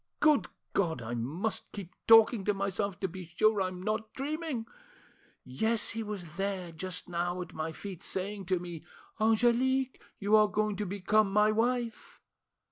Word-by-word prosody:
Good 305 Hz, -2 st, +4 dB, 0.3 s
God! 165 Hz, -8 st, +1 dB
I 115 Hz, +1 st, -4 dB
must 150 Hz, -, -2 dB
keep 190 Hz, -3 st, -8 dB
talking 225 Hz, -1 st, +7 dB
to 205 Hz, -, +2 dB
myself, 195 Hz, 0 st, -2 dB
to 190 Hz, -, +1 dB
be 185 Hz, 0 st, -8 dB
sure 215 Hz, +1 st, +4 dB
I'm 185 Hz, -1 st, -3 dB
not 215 Hz, +1 st, -2 dB
dreaming. 290 Hz, -3 st, -3 dB, 0.8 s
Yes, 220 Hz, -, 0 dB
he 225 Hz, -, -3 dB
was 190 Hz, -7 st, -6 dB
there, 195 Hz, -3 st, -2 dB
just 180 Hz, +2 st, -5 dB
now, 175 Hz, +1 st, -2 dB
at -, -, -14 dB
my 160 Hz, +1 st, -3 dB
feet, 185 Hz, +1 st, -8 dB
saying 195 Hz, 0 st, -4 dB
to 185 Hz, 0 st, +2 dB
me, 170 Hz, -2 st, -7 dB, 0.4 s
'Angelique, 245 Hz, +4 st, +2 dB, 0.2 s
you 205 Hz, +1 st, +3 dB
are 215 Hz, 0 st, +6 dB
going 210 Hz, 0 st, 0 dB
to 210 Hz, 0 st, -2 dB
become 200 Hz, +2 st, +2 dB
my 210 Hz, +1 st, +4 dB
wife. 235 Hz, +1 st, -1 dB
200 Hz, 160 wpm, -31 LUFS, 180-220 Hz, 0.8 s, talking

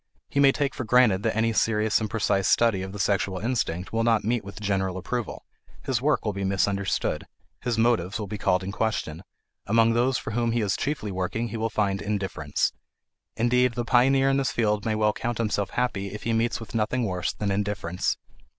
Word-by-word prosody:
He 140 Hz, -, 0 dB
may 140 Hz, -1 st, +7 dB
take 140 Hz, 0 st, -1 dB
for -, -, -4 dB
granted 115 Hz, -4 st, +4 dB
that 110 Hz, 0 st, 0 dB
any 115 Hz, 0 st, +2 dB
serious 110 Hz, 0 st, +2 dB
and 110 Hz, -, -2 dB
precise 100 Hz, -4 st, +1 dB
study 110 Hz, +2 st, +3 dB
of 95 Hz, 0 st, -5 dB
the 105 Hz, -, -7 dB
sexual 100 Hz, -1 st, 0 dB
instinct 100 Hz, -5 st, -2 dB
will 115 Hz, 0 st, +1 dB
not 115 Hz, -2 st, +3 dB
meet 115 Hz, +2 st, 0 dB
with 100 Hz, +2 st, -9 dB
general 95 Hz, -3 st, -1 dB
approval; 120 Hz, +5 st, -4 dB, 0.4 s
his 125 Hz, -3 st, 0 dB
work 150 Hz, -2 st, +1 dB
will 105 Hz, -, 0 dB
be 100 Hz, 0 st, -4 dB
misunderstood; 100 Hz, 0 st, 0 dB, 0.3 s
his 120 Hz, -2 st, -1 dB
motives 110 Hz, -5 st, +2 dB
will 105 Hz, -, -4 dB
be 105 Hz, +1 st, -6 dB
called 90 Hz, -1 st, +1 dB
in 95 Hz, -, -4 dB
question; 100 Hz, -7 st, -2 dB, 0.5 s
among 115 Hz, +2 st, +4 dB
those 125 Hz, +3 st, +2 dB
for -, -, -5 dB
whom 115 Hz, +1 st, 0 dB
he 120 Hz, -, +1 dB
is 100 Hz, -2 st, 0 dB
chiefly 135 Hz, -8 st, -2 dB
working 95 Hz, +5 st, -2 dB
he 115 Hz, -, -5 dB
will 110 Hz, +1 st, -1 dB
find 100 Hz, -2 st, 0 dB
indifference. 100 Hz, -2 st, -1 dB, 0.6 s
Indeed, 125 Hz, +2 st, +2 dB
the 120 Hz, -, -2 dB
pioneer 135 Hz, +3 st, +4 dB
in 135 Hz, -, +2 dB
this 135 Hz, -1 st, 0 dB
field 105 Hz, -3 st, 0 dB
may 110 Hz, -, +1 dB
well 105 Hz, 0 st, +2 dB
count 120 Hz, +1 st, -3 dB
himself 105 Hz, -3 st, -1 dB
happy 115 Hz, -6 st, -1 dB
if 105 Hz, +2 st, -7 dB
he 115 Hz, -, 0 dB
meets 115 Hz, +1 st, +1 dB
with 115 Hz, -, -10 dB
nothing 115 Hz, +3 st, 0 dB
worse 90 Hz, -4 st, -1 dB
than 105 Hz, -1 st, -2 dB
indifference. 100 Hz, -3 st, -1 dB
110 Hz, 205 wpm, -26 LUFS, 100-120 Hz, 0.6 s, may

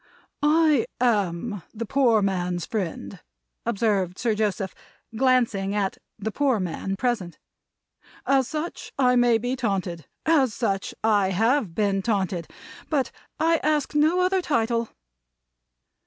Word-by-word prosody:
"I 300 Hz, -3 st, +4 dB
am 205 Hz, -4 st, 0 dB
the 230 Hz, +2 st, -3 dB
Poor 235 Hz, -4 st, +3 dB
Man's 180 Hz, -3 st, -1 dB
Friend," 200 Hz, -8 st, -4 dB, 0.5 s
observed 195 Hz, -4 st, 0 dB
Sir 235 Hz, -3 st, +1 dB
Joseph, 205 Hz, -3 st, -1 dB, 0.4 s
glancing 225 Hz, -6 st, +2 dB
at 200 Hz, -2 st, -1 dB, 0.2 s
the 220 Hz, +1 st, -3 dB
poor 265 Hz, -2 st, +1 dB
man 185 Hz, +2 st, -3 dB
present. 195 Hz, -8 st, -2 dB, 0.9 s
"As 270 Hz, -2 st, +3 dB
such 315 Hz, +3 st, -5 dB
I 250 Hz, -2 st, +4 dB
may 245 Hz, -2 st, +4 dB
be 245 Hz, +3 st, -2 dB
taunted. 190 Hz, -, -2 dB, 0.2 s
As 280 Hz, -8 st, +3 dB
such 200 Hz, -4 st, -2 dB
I 205 Hz, -3 st, +3 dB
have 220 Hz, 0 st, +1 dB
been 200 Hz, -2 st, +1 dB
taunted. 190 Hz, -5 st, -1 dB, 0.4 s
But 275 Hz, -6 st, 0 dB, 0.3 s
I 330 Hz, +1 st, +3 dB
ask 300 Hz, -2 st, 0 dB
no 310 Hz, +5 st, +3 dB
other 370 Hz, +1 st, +2 dB
title." 230 Hz, -6 st, 0 dB
225 Hz, 125 wpm, -25 LUFS, 195-265 Hz, 0.9 s, I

